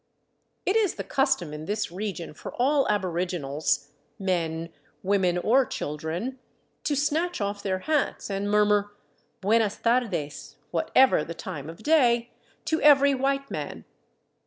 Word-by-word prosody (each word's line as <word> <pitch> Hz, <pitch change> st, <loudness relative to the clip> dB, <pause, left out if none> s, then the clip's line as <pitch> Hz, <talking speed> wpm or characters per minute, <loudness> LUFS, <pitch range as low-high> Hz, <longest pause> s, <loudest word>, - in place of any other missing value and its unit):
It 380 Hz, -, +1 dB
is 435 Hz, -5 st, +2 dB
the -, -, -4 dB
custom 270 Hz, -, 0 dB
in 150 Hz, +1 st, -6 dB
this 205 Hz, -1 st, -2 dB
region 180 Hz, -4 st, -5 dB
for -, -, -9 dB
all 275 Hz, +3 st, +2 dB
aboriginals, 175 Hz, -7 st, -1 dB, 0.3 s
men, 165 Hz, -3 st, -2 dB, 0.3 s
women, 190 Hz, -2 st, +2 dB
or 245 Hz, +9 st, +4 dB
children, 170 Hz, -, -4 dB, 0.5 s
to 290 Hz, -, +1 dB
snatch 310 Hz, +5 st, 0 dB
off 200 Hz, 0 st, -2 dB
their 190 Hz, -2 st, -1 dB
hats 300 Hz, +9 st, -1 dB
and 200 Hz, +1 st, -2 dB
mur 210 Hz, 0 st, +4 dB
mur 205 Hz, 0 st, +2 dB, 0.3 s
" -, -, -42 dB
Buenas 215 Hz, +1 st, +2 dB
tardes 225 Hz, -12 st, -1 dB
" -, -, -39 dB
— -, -, -40 dB
whatever 260 Hz, -12 st, +4 dB
the 170 Hz, -, -7 dB
time 165 Hz, -4 st, -6 dB
of 165 Hz, +6 st, -11 dB
day 240 Hz, -6 st, +3 dB, 0.2 s
— -, -, -36 dB
to 315 Hz, -, 0 dB
every 280 Hz, -1 st, +6 dB
white 275 Hz, +1 st, -1 dB
man. -, -, -5 dB
205 Hz, 155 wpm, -26 LUFS, 175-270 Hz, 0.5 s, every